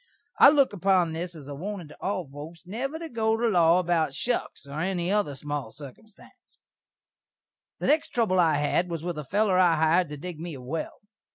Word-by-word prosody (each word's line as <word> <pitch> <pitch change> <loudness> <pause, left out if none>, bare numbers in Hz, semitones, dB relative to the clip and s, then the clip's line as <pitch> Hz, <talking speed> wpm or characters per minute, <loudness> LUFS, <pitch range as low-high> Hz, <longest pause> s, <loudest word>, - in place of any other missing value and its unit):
I - - +10
look 280 -6 +3
upon 185 -3 +2
this 170 +2 -5
as 145 -4 -11
a 145 - -6
warnin' 180 +3 -6
to 150 - -14
all 185 -4 -2
foaks 150 +5 -11
never 255 - -4
to 330 0 -6
go 225 -5 0
to 235 +1 +1
law 175 -5 +4
about 165 -5 0
shuks, 245 -10 -3
or 140 +2 -6
any 180 +1 -1
other 205 -9 0
small 145 -4 -5
sirkumstanse. 145 - -15 1.2
The - - -5
next 305 +2 +2
trubble 220 -6 +1
I 160 -3 +4
had 150 +5 +1
was 165 -2 -4
with 175 -3 -3
a - - -5
feller 195 +4 +1
I 175 -3 +5
hired 160 +2 +2
to 150 - -6
dig 170 +1 -7
me 165 -2 -6
a 130 - -9
well. 150 +6 -5
175 Hz, 200 wpm, -26 LUFS, 150-200 Hz, 1.2 s, I